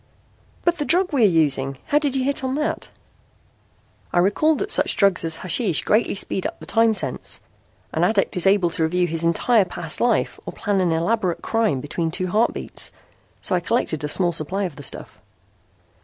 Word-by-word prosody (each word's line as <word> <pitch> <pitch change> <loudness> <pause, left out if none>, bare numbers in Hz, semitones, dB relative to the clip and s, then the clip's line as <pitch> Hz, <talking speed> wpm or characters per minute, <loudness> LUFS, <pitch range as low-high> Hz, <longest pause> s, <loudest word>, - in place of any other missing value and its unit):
"But 345 0 +2
the - - 0
drug 360 +2 +1
we 275 - +2
are - - +7
using. 140 -6 +1
How 295 - +2
did 285 -3 -1
you 265 - +1
hit 275 0 -1
on 260 0 -1
that?" 300 +1 -2 1.2
"I - - -1
recalled 205 - +3
that 405 +1 -2
such - - +2
drugs 195 -4 +3
as 165 -1 +4
hashish 185 - 0
greatly 215 0 +1
speed 190 -1 -1
up - - -10
the - - -10
time 225 -1 +3
sense. 140 -10 -2 0.5
An 160 - 0
addict 195 +1 +1
is 180 +1 +1
able 190 -3 +3
to 165 - -3
review 175 +3 +1
his 165 -1 -3
entire 205 +7 +3
past 170 -3 -4
life 240 -2 +1
or - - -5
plan 205 -3 -1
an 175 -2 +1
elaborate 180 +2 0
crime 220 - 0
between 165 +3 -2
two 185 +3 -2
heartbeats. 215 +5 0 0.5
So 200 - -2
I 180 - +3
collected 170 - -1
a - - -1
small 175 +3 +1
supply 175 +5 -2
of 175 -6 -4
the 145 - -10
stuff." 135 - -5
190 Hz, 195 wpm, -22 LUFS, 165-230 Hz, 1.2 s, are